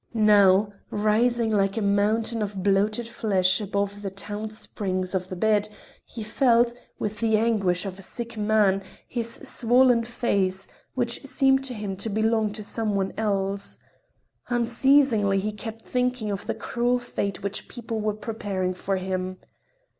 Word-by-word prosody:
Now, 205 -2 +5 0.2
rising 225 +2 +2
like 195 0 +1
a - - 0
mountain 215 +3 +1
of 200 -2 -3
bloated 205 +4 +1
flesh 195 -4 +1
above 200 0 -2
the 200 - -3
taut 205 +2 -6
springs 185 -3 -4
of 185 -1 -1
the 185 - -6
bed, 210 +2 +2 0.3
he 230 - -8
felt, 235 +1 +3 0.2
with 210 0 -3
the 220 -1 +3
anguish 205 -5 +1
of 195 0 -6
a - - -8
sick 235 +4 -4
man, 210 -2 +2 0.3
his 230 -2 -1
swollen 245 0 +4
face, 195 -5 0 0.3
which 240 0 -1
seemed 270 0 +3
to 255 -2 -4
him 205 -2 -4
to 210 +3 -2
belong 220 0 +1
to 215 0 -6
some 215 0 -1
one 195 -1 -1
else. 200 -2 -1 0.7
Unceasingly 240 -3 +3
he 205 +2 -1
kept 225 +1 -8
thinking 250 -4 -1
of 195 - -5
the - - -1
cruel 245 +1 0
fate 200 -6 -4
which 200 0 -4
people 230 -2 -5
were 210 -1 -1
preparing 205 -4 -3
for 195 +1 -2
him. 185 0 -3
215 Hz, 155 wpm, -25 LUFS, 195-230 Hz, 0.7 s, Now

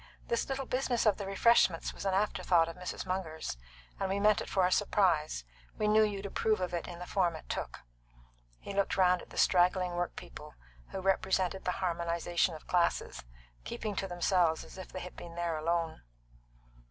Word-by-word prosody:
This 235 - 0
little 270 0 -2
business 250 -2 0
of 210 -3 +4
the 200 - -5
refreshments 195 -3 +3
was - - -8
an 190 -1 +1
afterthought 185 -4 +2
of 165 - -6
Mrs. 180 +1 -5
Munger's, 180 - -3 0.4
and 195 - -1
we 195 +1 0
meant 210 0 +4
it - - -6
for 190 -2 +3
a 180 - +1
surprise 175 - +2 0.3
we 210 - +1
knew 215 +1 +5
you'd 205 -2 0
approve 215 +2 +1
of 180 -1 -2
it 170 - -2
in 175 - -7
the 180 - -7
form 180 -3 +1
it 155 - -10
took." - - -4 0.8
He 200 - -8
looked 200 0 0
round 180 -1 +4
at - - -14
the - - -12
straggling 180 0 +3
workpeople, 175 - -5 0.3
who 190 - -5
represented 190 0 +1
the 180 - +1
harmonisation 170 0 0
of 155 - -12
classes, 175 -2 0 0.4
keeping 210 - -4
to 195 - -1
themselves 175 -2 +2
as - - -13
if 185 -1 -9
they 185 - -6
had 180 - -8
been 170 -1 -9
there 170 -1 -1
alone. 165 +1 -1
185 Hz, 190 wpm, -32 LUFS, 170-195 Hz, 0.8 s, knew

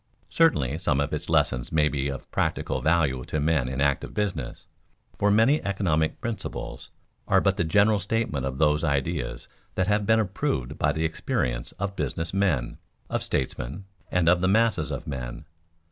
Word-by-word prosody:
(Certainly 80 - +2
some 75 -7 +1
of 70 +2 -1
its 80 +4 -3
lessons 75 -6 +1
may 75 -1 +3
be 70 -2 -1
of 70 -1 -6
practical - - -1
value 80 -6 +2
to 75 - -2
men 75 -4 +1
in 65 +1 -4
active 70 -1 0
business) 105 -3 -3 0.5
for 105 - +3
many 115 +9 +4
economic 85 -6 0
"principles" 95 - -5 0.4
are - - +5
but - - +2
the - - 0
general 100 +5 +3
statement 100 - -1
of 65 -1 -3
those 75 +1 +3
ideas 70 -2 -1 0.3
that 95 - +1
have 105 0 +1
been 110 0 +5
approved 90 - -2
by 70 - +3
the 80 +1 -1
experience 60 -6 -2
of 100 +1 -4
business 80 +3 -2
men, 90 -11 0 0.3
of - - 0
statesmen, 65 +7 -3 0.2
and 90 -2 +1
of 85 +1 +5
the 90 - +2
masses 105 -5 +2
of - - -4
men. - - -6
80 Hz, 170 wpm, -26 LUFS, 70-100 Hz, 0.5 s, are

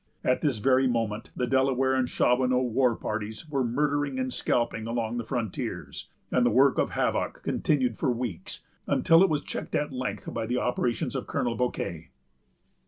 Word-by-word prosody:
At 125 - +2
this 145 -7 +1
very 130 +3 +3
moment, 115 -3 -1
the 125 - 0
Delaware 130 0 +2
and 130 -1 +1
Shawanoe 125 +1 +2
war 125 0 +3
parties 110 +8 -5
were 140 -3 0
murdering 145 +2 0
and 130 -1 -2
scalping 115 -2 0
along 115 0 -2
the 120 - -2
frontiers; 115 -3 -4 0.2
and 125 - +3
the 120 - +4
work 130 +4 +4
of - - 0
havoc - - -1
continued 130 -6 0
for - - +1
weeks, 120 -7 -4 0.2
until 165 +1 +5
it 195 - +5
was 150 -2 0
checked - - -5
at 145 -2 -1
length 125 -6 -4
by 115 -1 -2
the 125 +2 0
operations 125 -1 -1
of - - -3
Colonel 120 - -1
Bouquet. 85 -10 -3
125 Hz, 170 wpm, -27 LUFS, 115-135 Hz, 0.2 s, until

